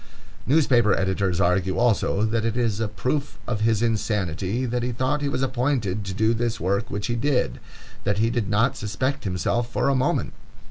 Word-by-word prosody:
Newspaper 125 -8 +4
editors 95 -2 0
argue 95 +1 +1
also 110 -3 +2
that 110 0 0
it 115 +1 -1
is 115 -4 0
a 110 - 0
proof 135 +7 -2
of 110 -3 -2
his 110 0 +2
insanity 105 0 -1
that 120 0 -1
he 125 +1 -1
thought 130 +5 -1
he 145 - 0
was 135 -1 -1
appointed 125 -6 0
to 95 -1 -5
do 110 +2 +2
this 115 0 -1
work 100 +5 -1
which 100 0 -3
he 120 - -1
did,—that 115 - -2
he 115 +2 +2
did 115 -5 -1
not 105 +2 +2
suspect 130 +6 -2
himself 110 +6 -1
for - - +1
a 140 - +2
moment! 130 - 0
115 Hz, 185 wpm, -24 LUFS, 100-125 Hz, -, Newspaper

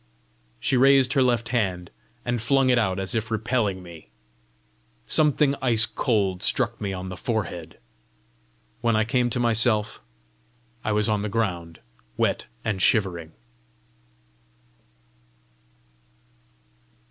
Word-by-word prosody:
She 130 - +1
raised 135 0 +5
her 135 - +3
left 120 -3 +1
hand, 95 -7 -2 0.3
and 120 -2 -1
flung 135 +2 +2
it 125 - +3
out 95 -4 0
as 95 0 -2
if 110 -1 -2
repelling 110 -4 -1
me. 85 -7 -13 1.0
Something 150 -2 +3
ice 115 -4 +4
cold 100 -9 -1
struck - - 0
me 100 -2 -2
on 95 0 -6
the 90 - -6
forehead. 90 - -4 1.0
When 115 -1 +1
I 110 - +3
came 120 +2 0
to 120 - -2
myself, 110 -2 +1 0.8
I 110 - -1
was 105 0 +1
on 105 -2 0
the 105 - -3
ground, 90 -7 -3 0.4
wet - - 0 0.2
and 105 -4 -2
shivering. 85 -8 +1
110 Hz, 120 wpm, -24 LUFS, 95-120 Hz, 1.0 s, raised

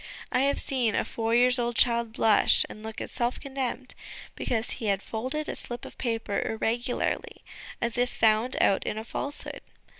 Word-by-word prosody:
I - - +2
have 280 +2 +2
seen 245 -6 +1
a - - +1
four 225 0 -1
years 250 +1 +5
old 240 0 -1
child 235 -2 +3
blush 220 -2 +4
and 215 - -10
look 220 0 -6
as - - -4
self 240 0 -1
condemned, 265 -2 -4 0.4
because 230 -1 -1
he 225 - -2
had 200 -1 +1
folded 260 +7 -3
a - - -2
slip 240 0 -2
of - - -10
paper 225 -4 -1
irregularly, 235 +2 -2 0.4
as 235 0 -1
if 245 0 +2
found 225 +3 +2
out 195 - +3
in 210 - -3
a 220 - -3
falsehood. 285 +5 -4
235 Hz, 180 wpm, -27 LUFS, 220-250 Hz, 0.4 s, years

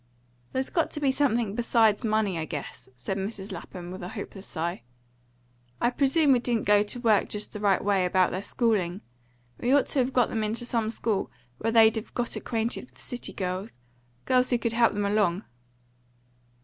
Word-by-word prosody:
"There's 260 0 -2
got 330 -3 +1
to - - -4
be 280 -2 +2
something 240 -7 +1
besides 225 -1 +3
money, 215 -5 +1
I 160 - -2
guess," 150 -3 -6
said 190 +11 -3
Mrs. 200 0 -5
Lapham, 175 -1 -8
with 185 - -7
a 175 - -5
hopeless 195 +1 -8
sigh. 170 -2 -3 1.0
"I 240 - +2
presume 280 +3 +3
we 255 - +5
didn't 235 -2 -1
go 205 0 +5
to 210 +4 -1
work 220 -5 +3
just 210 0 -2
the 210 - -5
right 200 -2 +2
way 200 -2 +3
about 180 0 +2
their 185 - -3
schooling. 200 -5 0 0.6
We 245 - 0
ought 285 0 +5
to 280 - +1
have 255 +1 +1
got 250 -2 +3
them 220 - -1
into 225 +3 -1
some 230 -2 0
school 220 -3 -1 0.3
where 225 - 0
they'd 225 0 +6
have 220 - -7
got 240 -1 -1
acquainted 230 +2 -2
with - - -23
city 245 - -2
girls 185 +3 -4 0.5
girls 255 -1 +3
who 245 - +3
could 230 -1 -2
help 235 0 +4
them 205 0 -1
along." 200 -2 +1
220 Hz, 190 wpm, -27 LUFS, 195-240 Hz, 1.0 s, they'd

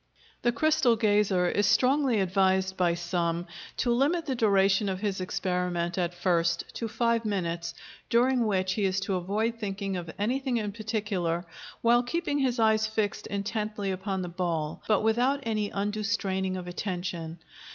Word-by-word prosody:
The 240 - +3
crystal 300 -1 +3
gazer 205 -4 +2
is 205 +3 +2
strongly 255 -2 +3
advised 190 0 +2
by 175 -2 +2
some 175 -1 -1 0.3
to 240 - +1
limit 295 +8 +2
the 270 - -1
duration 200 -3 +3
of 190 -1 -2
his 200 -3 -1
experiment 180 -2 -1
at 175 -1 -1
first 170 -1 +1
to 230 - -2
five 230 +1 +1
minutes, 170 -5 -2 0.3
during 245 0 +3
which 190 -2 +1
he 205 -1 0
is 190 0 +1
to 195 0 -2
avoid 210 +6 -1
thinking 195 -2 -3
of 170 -2 -6
anything 250 +4 0
in 210 -2 -2
particular 205 -6 -2 0.4
while 240 +1 +5
keeping 290 +3 -1
his 260 -2 +1
eyes 220 -1 +3
fixed 215 -1 -2
intently 210 0 -2
upon 190 0 -3
the - - -4
ball, 170 -3 -2
but 215 -2 +3
without 245 +5 +2
any 215 -2 -1
undue 205 +2 -2
straining 190 -2 -1
of 180 - -6
attention. 175 -3 -4
200 Hz, 160 wpm, -28 LUFS, 185-230 Hz, 0.4 s, while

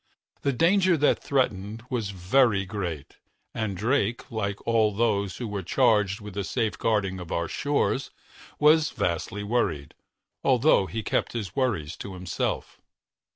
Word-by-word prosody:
The 140 - +1
danger 180 +6 +3
that 150 - +2
threatened 110 -5 -1
was 115 -5 -1
very 100 +2 +2
great, 90 -7 -5 0.4
and 110 -4 -3
Drake, 115 +2 0
like 100 -3 -2
all 115 -2 +3
of 100 - -9
those 100 -5 +1
who 120 - -4
were 105 -2 -3
charged 105 0 +2
with 105 -1 -8
the 100 0 -2
safeguarding 105 -4 0
of 90 -2 -8
our 85 - -1
shores, 140 -1 0 0.5
was 155 +1 +5
vastly 90 +4 -2
worried, 100 - -1 0.5
although 95 - +4
he 110 +2 -4
kept - - -1
his 105 -6 -5
worries 100 - -1
to 95 -2 -7
himself. 90 -1 -3
105 Hz, 145 wpm, -26 LUFS, 95-125 Hz, 0.5 s, was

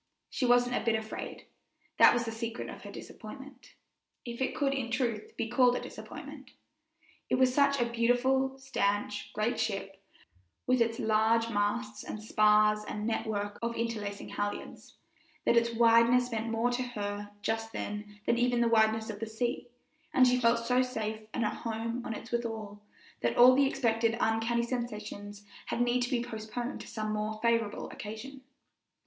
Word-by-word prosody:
She 255 - 0
wasn't 245 0 +4
a - - -1
bit 230 -1 +2
afraid; 220 0 -6 0.5
that - - +8
was 240 -1 0
the 225 - -3
secret 230 +1 -5
of - - -10
her - - -9
disappointment, 265 +3 -11 0.5
if 235 +1 -6
it 265 - 0
could 275 -2 +1
in 265 -4 -2
truth 235 -3 -2
be - - -1
called 245 +1 +4
a - - -1
disappointment. 280 -3 -9 0.8
It - - +3
was 255 0 +3
such 280 0 +3
a 240 - +3
beautiful, 245 +3 +1
stanch, 205 -6 -1
great 215 +3 0
ship, 195 -3 -3 0.6
with 255 -1 +3
its 230 0 +1
large 225 +1 +2
masts 115 - -1
and 215 - -6
spars 210 0 +4
and 210 0 -5
network 210 -2 -2
of 235 0 -2
interlacing 215 -3 -3
halyards, 205 0 -5 0.5
that - - +4
its 235 0 +3
wideness 235 +2 +5
meant 225 0 -2
more 230 +2 +1
to 245 +1 -1
her 205 -4 -4
just 225 0 -1
then 210 0 -6
than 235 - +2
even 245 0 +2
the 235 - +4
wideness 220 0 +3
of 205 - -9
the 225 - -4
sea; 240 +2 -2 0.5
and 255 - +7
she 250 0 +3
felt 230 0 +3
so 250 +1 +3
safe 220 -4 -3
and 230 - -1
at 210 - -2
home 230 +1 -3
on 225 - -4
it 230 - -9
withal, 220 -3 -3 0.4
that 120 -1 0
all 250 +1 +9
the 275 +1 +4
expected 230 -4 +1
uncanny 225 +1 +1
sensations 210 -4 -5 0.2
had - - -2
need 245 +1 +2
to 245 - 0
be 245 -3 0
postponed 235 +2 -5
to - - -10
some 215 -2 -3
more 215 +1 -2
favorable 230 -3 +1
occasion. 230 +6 -8
230 Hz, 170 wpm, -30 LUFS, 215-245 Hz, 0.8 s, all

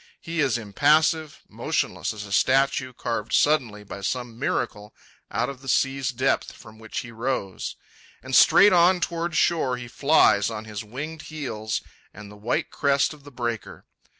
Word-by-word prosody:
He 165 0 -5
is 135 -5 +2
impassive, 155 +8 +2
motionless - - -2
as 105 -1 -7
a 100 - -11
statue 135 +2 +2
carved 115 -3 -4
suddenly 125 -9 +2
by 100 -1 -9
some 120 +2 -3
miracle 105 -5 -3 0.3
out - - -1
of 135 -1 -8
the 135 - -12
sea's 135 +1 +1
depth 130 0 0
from 110 -2 -15
which 110 -1 -5
he 120 - -10
rose. 115 -4 -3 0.5
And - - -2
straight 205 -1 +7
on 180 +1 +5
toward 170 -1 -2
shore 155 -6 +2
he 125 -1 -8
flies 120 -7 +3
on 110 -1 -6
his 110 -1 -6
winged 145 +9 -7
heels 120 -8 -4 0.3
and 105 0 -11
the - - -12
white 105 +4 -2
crest 140 +1 +1
of 145 -2 -17
the 145 - -11
breaker. 120 -3 -5
125 Hz, 165 wpm, -25 LUFS, 110-150 Hz, 0.5 s, straight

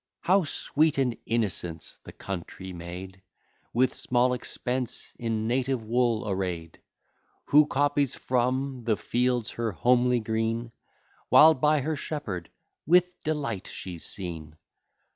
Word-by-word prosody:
How 190 0 +3
sweet 150 +1 +1
and 125 -3 +1
innocent's 90 -7 -2
the - - -10
country 95 0 -7
maid, 90 +2 -8 0.5
With 125 +2 +2
small 125 0 +1
expense 125 0 -3
in 110 -2 -1
native 125 -1 0
wool 115 -2 +1
array'd; 90 -4 -3 0.7
Who 150 +1 +6
copies 145 -1 +1
from 130 +1 -1
the 110 -2 +1
fields 125 -1 0
her 115 -3 -2
homely 125 +6 +3
green, 115 +1 -2 0.6
While 160 +1 +8
by 150 +1 +2
her 155 +3 -1
shepherd 115 - -5 0.4
with 180 +2 +4
delight 140 -11 -2
she's 90 -3 -7
seen! 80 -5 -6
120 Hz, 120 wpm, -27 LUFS, 95-135 Hz, 0.7 s, While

